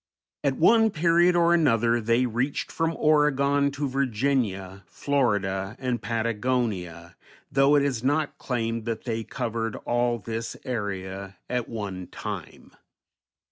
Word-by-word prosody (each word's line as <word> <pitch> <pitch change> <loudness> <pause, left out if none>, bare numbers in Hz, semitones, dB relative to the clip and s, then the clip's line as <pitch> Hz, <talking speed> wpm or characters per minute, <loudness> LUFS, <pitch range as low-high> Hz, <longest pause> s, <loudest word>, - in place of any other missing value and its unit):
At 140 -2 +1
one 225 +6 +5
period 175 0 +3
or 170 0 +4
another 120 -7 +3
they 115 +3 +2
reached 125 +4 -2
from 165 0 -1
Oregon 145 -2 +3
to 145 +1 -2
Virginia, 115 -7 -1
Florida, 105 -8 0
and 125 -2 -2
Patagonia, 110 -6 -2 0.4
though 140 +2 +4
it 145 - +4
is 130 -5 -1
not 145 +3 0
claimed 115 -3 -2
that 115 -2 -3
they 115 -2 -2
covered 115 -2 -3
all 120 0 0
this 115 +2 -5
area 100 -5 -4
at 125 -2 -2
one 95 -5 -5
time. - - -7
120 Hz, 125 wpm, -26 LUFS, 110-140 Hz, 0.4 s, one